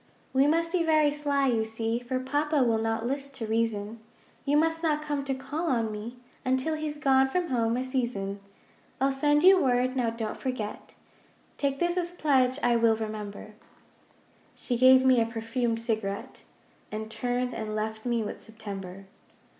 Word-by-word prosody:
'We 270 +2 +4
must 330 +2 +2
be 365 -1 +1
very 310 -3 +3
sly, 285 -1 0
you 235 -4 +2
see, 225 +1 -2
For 250 +1 -3
Papa 290 +2 +1
will 230 -2 +2
not 225 0 -1
list 275 +2 -3
to 230 - -4
reason. 220 -1 -1 0.5
You 290 +1 +3
must 325 +1 +2
not 305 -2 +1
come 290 -2 -2
to 270 -1 -1
call 280 +6 -4
on 230 -6 +1
me 215 +3 -6 0.3
Until 260 +5 0
he's 305 -1 -3
gone 270 -2 +4
from 350 +5 -1
home 230 -2 +1
a 255 - -1
season. 235 -7 -2 0.6
'I'll 270 +1 +3
send 295 +2 +2
you 375 0 +7
word, 255 0 +2
now 245 -3 +1
don't 225 -1 -4
forget, 240 -5 -5 0.6
Take 275 -1 0
this 345 +3 0
as 350 -1 0
pledge, 270 -7 +2
I 240 -1 +4
will 230 -1 +4
remember.' 215 -1 -6 1.0
She 245 - -3
gave 260 +1 +6
me 255 -2 +5
a - - +2
perfumed 230 0 -2
cigarette, 215 -3 -4 0.5
And 220 +1 -5
turned 245 +1 -1
and 215 -1 -4
left 220 0 -3
me 235 -2 0
with 210 - -6
September. 195 -4 -8
250 Hz, 170 wpm, -28 LUFS, 225-285 Hz, 1.0 s, you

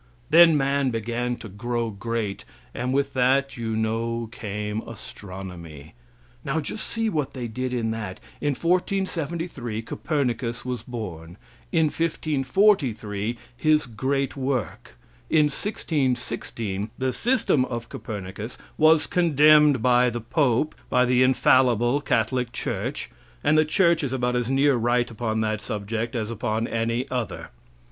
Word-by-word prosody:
Then 165 -1 +8
man 140 -1 +1
began 120 +1 -2
to 115 - -9
grow 115 +3 -3
great, 105 0 -3 0.3
and 125 +1 -2
with 140 +1 0
that 135 +1 +2
you 115 -2 -3
know 115 +1 -1
came 105 -1 -4
astronomy. 90 -8 -9 0.5
Now 155 +4 -1
just 160 +8 -3
see 225 -1 0
what 150 -10 -1
they 125 -2 -4
did 125 +3 -3
in 115 -3 -1
that. 105 -4 -5 0.2
In 145 -2 0
1473 170 - -1
Copernicus 125 -4 -2
was 125 -1 -3
born. 90 -8 -7 0.3
In 160 -2 +3
1543 135 - +1 0.2
his 155 +4 +3
great 135 +4 -1
work. 130 - -3 0.3
In 150 -2 +4
1616 125 - -2
the 130 -1 -1
system 240 - +2
of 120 -2 -5
Copernicus 105 +2 -6 0.2
was 155 0 +6
condemned 150 -5 +5
by 125 0 +4
the 120 0 -4
pope, 130 +3 +1 0.2
by 125 0 +4
the 125 0 +3
infallible 130 0 +4
Catholic 125 -4 0
church, - - -4 0.3
and 150 +1 +4
the 155 0 +5
church 170 +1 +3
is 135 -2 -2
about 125 -1 0
as 120 -1 0
near 135 +1 +3
right 120 +1 +1
upon 110 -1 -2
that 110 -1 -1
subject 110 +4 -3
as 110 -1 -2
upon 115 0 -1
any 115 +3 -1
other. 125 -4 -4
125 Hz, 135 wpm, -25 LUFS, 110-145 Hz, 0.5 s, Then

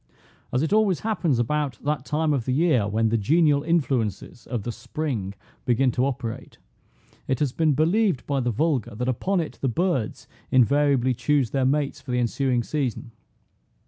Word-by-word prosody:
As 125 +4 +1
it 160 - 0
always 210 -5 +2
happens 185 - 0
about 140 +1 -1
that 145 -2 -1
time 155 0 0
of 130 -5 -1
the 130 - 0
year, 140 -8 +2
when 110 +2 +1
the 115 +1 +1
genial 150 +5 +3
influences 130 - -1
of 120 -5 -3
the 120 - -3
spring 115 -8 -4 0.3
begin 125 +1 +2
to 125 +3 +1
operate, 120 -4 -5 0.7
it 130 - 0
has 145 -1 0
been 155 +2 +2
believed 180 - +2
by 140 -1 0
the 125 -1 0
vulgar, 130 -2 0
that 125 +3 -3
upon 185 +10 0
it 160 - -5
the 135 - +1
birds 165 - -1 0.2
invariably 130 0 +3
choose 125 +1 +1
their 135 -2 +1
mates 140 +1 0
for 130 - -14
the 125 0 +1
ensuing 125 +1 0
season. 125 -3 -3
135 Hz, 175 wpm, -24 LUFS, 120-150 Hz, 0.7 s, genial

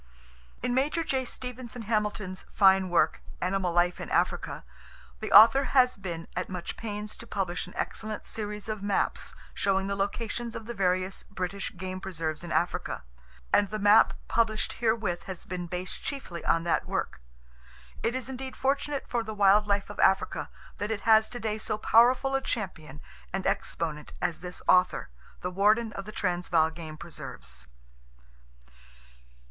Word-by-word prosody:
In 250 0 +1
Major 290 +6 +1
J. 265 -4 -1
Stevenson 250 -1 -6
Hamilton's 210 -3 -1
fine 190 -2 +5
work, 175 - +2 0.2
"Animal 185 -1 0
Life 175 +1 +2
in - - -6
Africa," - - 0
[O] - - -22
the 215 - -5
author 235 +5 +9
has 250 -1 +6
been 170 -4 -6
at 180 - -2
much 180 -2 -5
pains 210 -1 -5
to 230 - -11
publish 180 -5 -2
an 180 - -13
excellent 215 -1 -4
series 210 -1 -5
of 215 -2 -3
maps 200 -1 -1 0.2
showing 195 -1 +1
the 200 0 -1
locations 225 +3 -3
of 225 - -6
the 235 - -5
various 185 -1 0
British 190 -1 -5
game 185 +1 -5
preserves 165 -4 -3
in 170 - -6
Africa, 175 - -1 0.5
and 205 -1 +4
the 215 - -3
map 205 +1 +6
published 220 -2 +1
herewith 220 -6 +1
has 185 -3 -6
been 180 -1 -4
based 180 +2 -5
chiefly 225 -12 -5
on 165 - +3
that 170 - +1
work. - - -3 0.8
It 235 +2 0
is 260 -1 -3
indeed 265 0 -6
fortunate 275 +1 0
for 240 - 0
the 220 -1 -6
wild 205 +1 +5
life 200 -1 0
of - - -11
Africa 190 - +2 0.3
that 205 - -2
it 220 -2 -2
has 220 0 +5
today 220 -3 -3
so 215 - -2
powerful 245 +5 +4
a 270 - +2
champion 160 - -4 0.3
and 190 0 -3
exponent 150 -3 -2
as 175 -2 -1
this 180 0 -8
author, 180 0 +4 0.3
the 180 - -3
warden 210 +4 +3
of 195 - -6
the 215 - -7
Transvaal 175 -5 +1
Game 160 -1 -8
Preserves. 65 - -9
200 Hz, 160 wpm, -28 LUFS, 180-225 Hz, 0.8 s, author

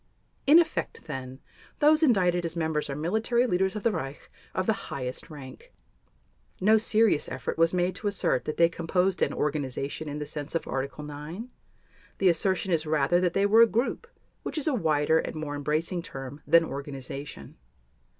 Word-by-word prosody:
In 300 +4 +8
effect, 345 +6 0
then, 130 0 -7 0.4
those 305 +2 +5
indicted 180 - +3
as 165 0 -2
members 160 -3 -1
are 140 - -3
military 220 - +1
leaders 190 -2 +1
of 210 - -4
the 230 - +3
Reich 135 -7 -6 0.2
of 185 - 0
the 220 - +3 0.2
highest 125 -2 -5
rank. 150 - -11 0.9
No 215 +3 +5
serious 220 -6 +3
effort - - -4
was 165 0 +3
made 180 0 +1
to 210 - -3
assert 200 -1 +1
that 155 - -4
they 170 - +6
composed 180 +2 0
an - - +2
"organization" 145 +1 -3
in 145 - -4
the 150 - -4
sense 150 +1 -6
of 165 - -1
Article 140 +2 -4
9. 150 +11 -7 0.7
The 190 - +4
assertion 185 +3 +1
is 160 -1 0
rather 155 +3 +2
that 180 -1 +1
they 195 - +2
were 220 +3 +6
a 230 - +8
"group", 240 - -1 0.3
which - - -5
is 305 - 0
a 305 - +2
wider 160 - +2
and - - -4
more 155 -2 -4
embracing 155 +5 -1
term 135 -1 -8
than 165 0 +6
"organization." 140 - -7
165 Hz, 180 wpm, -27 LUFS, 145-200 Hz, 0.9 s, In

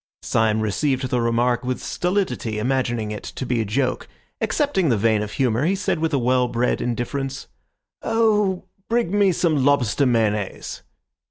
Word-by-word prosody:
Syme 110 -1 +1
received 130 +5 0
the 125 - +1
remark 120 +1 +1
with 125 0 -2
stolidity, 180 - -2
imagining 120 -2 -1
it 105 - -5
to 130 - -6
be 120 -2 0
a - - -2
joke. 130 +5 -1 0.3
Accepting 240 - +1
the 115 - +2
vein 110 0 +2
of 105 0 -5
humour, 125 -1 +1
he 185 +5 +2
said, 185 -4 -1
with 160 0 0
a 140 - +2
well 125 0 +2
bred 120 +1 0
indifference— 135 +3 -3 0.6
"Oh, 210 -4 +1 0.3
bring 230 -6 +1
me 200 -2 +4
some 160 -5 +1
lobster 140 -1 +2
mayonnaise." 105 -4 -1
130 Hz, 160 wpm, -22 LUFS, 115-160 Hz, 0.6 s, me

